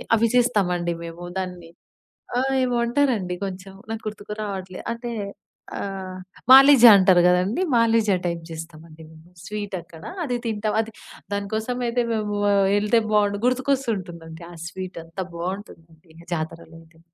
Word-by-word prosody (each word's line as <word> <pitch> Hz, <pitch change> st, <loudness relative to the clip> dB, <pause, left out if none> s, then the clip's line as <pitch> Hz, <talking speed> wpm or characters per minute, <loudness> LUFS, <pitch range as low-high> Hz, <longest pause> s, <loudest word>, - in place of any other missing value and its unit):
అవి 230 Hz, +1 st, +3 dB
చేస్తామండి 180 Hz, -8 st, +2 dB
మేము. 170 Hz, +1 st, -8 dB, 0.2 s
దాన్ని 180 Hz, -3 st, -6 dB, 0.7 s
ఆహ్, 270 Hz, +1 st, 0 dB
ఏమో 245 Hz, -1 st, 0 dB
అంటారండి, 235 Hz, -8 st, +1 dB
కొంచెం 190 Hz, 0 st, -8 dB, 0.2 s
నాకు 225 Hz, 0 st, -5 dB
గుర్తుకు 210 Hz, 0 st, -6 dB
రావట్లే. 190 Hz, -3 st, -6 dB
అంటే, 235 Hz, +1 st, -6 dB, 0.7 s
ఆహ్, 190 Hz, -2 st, -5 dB, 0.3 s
మాలిజ 270 Hz, -1 st, +9 dB
అంటారు 185 Hz, -2 st, +5 dB
గదండీ, 180 Hz, -, +1 dB
మాలిజ 230 Hz, -1 st, +3 dB, 0.2 s
టైప్ 170 Hz, -1 st, -2 dB
జేస్తామండి 160 Hz, 0 st, -10 dB
మేము. 160 Hz, +2 st, -17 dB, 0.2 s
స్వీటక్కడా 190 Hz, -6 st, -6 dB, 0.2 s
అది 250 Hz, -3 st, -1 dB
తింటాం. 215 Hz, -1 st, -1 dB
అది 225 Hz, 0 st, -8 dB, 0.4 s
దాని 200 Hz, 0 st, -3 dB
కోసమయితే 245 Hz, +2 st, -1 dB
మేమూ 210 Hz, -2 st, -2 dB, 0.4 s
ఎళ్తే 210 Hz, +3 st, +2 dB
బావుండు. 205 Hz, -1 st, +2 dB
గుర్తుకొస్తుంటుందండి 200 Hz, -11 st, -2 dB
ఆ -, -, -11 dB
స్వీటు. 185 Hz, 0 st, -7 dB
అంత 165 Hz, +3 st, -11 dB, 0.2 s
బావుంటుందండి 170 Hz, -3 st, -7 dB, 0.2 s
జాతరలోదింకా. 165 Hz, 0 st, -7 dB
195 Hz, 125 wpm, -23 LUFS, 170-225 Hz, 0.7 s, మాలిజ